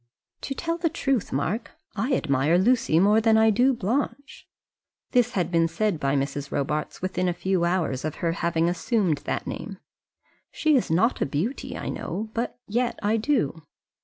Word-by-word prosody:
"To 275 - -4
tell 335 +2 -2
the 335 -1 +1
truth, 270 - -1
Mark, 170 - -2 0.2
I 240 +7 0
admire 145 - +2
Lucy 200 -5 +3
more 210 +4 +4
than 220 0 +4
I 220 0 +5
do 250 +6 +4
Blanche." 270 +6 -3 0.6
This 245 -1 +2
had 180 -4 -1
been 165 -1 +3
said 205 -1 -1
by 140 -1 0
Mrs. 140 +1 -2
Robarts 150 +4 -2
within 185 -1 0
a 175 - -2
few 185 -1 0
hours 170 -7 0
of 155 -1 -3
her 170 - -1
having 165 0 0
assumed 180 - 0
that - - -2
name. - - -6 0.7
"She's 300 -5 +2
not 200 +10 +2
a - - +3
beauty, 170 - -3
I - - -4
know, 215 +2 -4
but 235 +2 -3
yet 240 +2 0
I 215 +2 +2
do." 215 - 0
195 Hz, 170 wpm, -25 LUFS, 165-240 Hz, 0.7 s, I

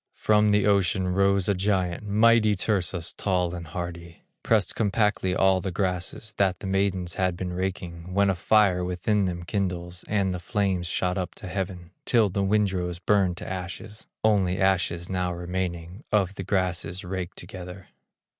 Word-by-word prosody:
From 105 0 +3
the 105 0 +3
ocean 95 -2 +2
rose 100 0 +2
a 100 - +3
giant, 95 -1 0
Mighty 110 +1 +4
Tursas, 90 -4 -1
tall 90 -3 0
and 85 -2 -6
hardy, 85 +1 -7 0.2
Pressed 105 -5 +1
compactly 105 -3 +1
all 95 -1 +3
the 95 - -3
grasses, 95 +4 -2
That 95 -2 +2
the - - -9
maidens 95 -2 0
had 90 -2 +1
been 90 -1 -4
raking, 90 -2 -4
When 100 0 +4
a 95 - +3
fire 95 0 +3
within 90 +3 0
them 85 -1 -3
kindles, 90 -2 -3
And 100 -3 +1
the 90 - -4
flames 95 -2 -1
shot 90 +2 0
up 90 - -4
to 105 - -8
heaven, 90 -2 -4
Till 115 -4 +3
the 100 +2 -1
windrows 95 -4 +1
burned 95 -1 +2
to - - -7
ashes, 95 +3 -6 0.2
Only 100 -4 +2
ashes 90 -3 +1
now 90 -1 -1
remaining 90 +3 -4
Of 100 -3 +2
the 95 - -6
grasses 90 -1 -1
raked 90 0 -5
together. 90 0 -9
95 Hz, 165 wpm, -26 LUFS, 90-100 Hz, 0.2 s, Mighty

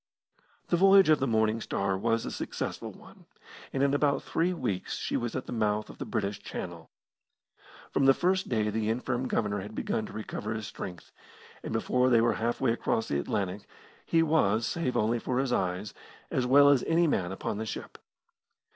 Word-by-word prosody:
The 175 - +3
voyage 195 0 +6
of 155 - +5
the 135 - 0
Morning 110 -1 +1
Star 100 -2 -1
was 115 +4 0
a - - -4
successful - - -4
one, - - -17 0.4
and 135 - 0
in 140 0 +2
about 145 0 +2
three 170 +2 0
weeks 100 - -3
she - - -3
was 120 -1 -2
at 130 - -3
the - - -8
mouth 105 -2 0
of - - -17
the - - -5
British 105 -2 -2
Channel. 85 -2 -7 1.0
From 140 - +2
the 135 - +7
first 185 +2 +1
day 110 -3 +1
the 110 0 -1
infirm 125 +2 -1
Governor 105 -4 0
had 105 +3 -8
begun 110 - -2
to - - -11
recover 110 0 -4
his 110 -1 -4
strength, 90 -3 -8 0.5
and - - -6
before 125 +3 +2
they 120 -2 +5
were 115 +1 +3
halfway 120 +2 0
across 115 -1 -1
the 70 - 0
Atlantic, 95 +5 -3 0.4
he 165 -1 +2
was, 115 -9 +2
save 165 -7 -1
only 115 +3 +1
for 125 +2 -2
his 130 -1 +1
eyes, 95 0 -1 0.4
as 125 -1 0
well 140 +2 +7
as 140 -3 +4
any 170 +1 +3
man 95 - 0
upon 100 +2 -4
the 110 - -3
ship. - - -7
115 Hz, 190 wpm, -29 LUFS, 105-135 Hz, 1.0 s, the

